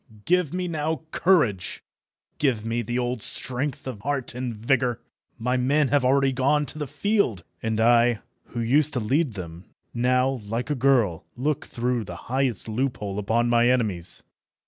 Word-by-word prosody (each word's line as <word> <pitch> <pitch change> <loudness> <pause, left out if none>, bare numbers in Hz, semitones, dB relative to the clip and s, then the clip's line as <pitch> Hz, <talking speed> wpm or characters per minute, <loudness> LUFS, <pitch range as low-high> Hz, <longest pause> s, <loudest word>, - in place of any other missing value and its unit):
give 180 -4 +2
me 180 0 -2
now 160 -1 -2
courage, 125 - +2 0.6
give 120 -7 +1
me 115 +1 -1
the 120 +2 -3
old 125 -2 -1
strength 130 +6 -4
of 130 -6 -5
heart 140 0 -1
and 125 -1 -4
vigour. 120 +1 +1 0.4
My 125 +2 0
men 140 +3 +2
have 145 0 +3
already 135 +1 +3
gone 140 +3 +2
to 150 +3 -7
the 150 - -3
field, 200 - 0 0.2
and 110 0 -1
I, 120 0 +4 0.3
who 120 - -4
used 145 +6 +3
to 125 - 0
lead 130 +4 +1
them, 85 -2 -8 0.3
now, 125 +1 +1
like 115 +7 -3
a - - +3
girl, 120 - +2
look 145 +3 -1
through 120 -1 -1
the 90 - -7 0.2
highest 130 -5 0
loophole 110 -4 -2
upon 115 +4 +1
my 120 0 +4
enemies. 100 -9 +1
125 Hz, 165 wpm, -25 LUFS, 115-140 Hz, 0.6 s, I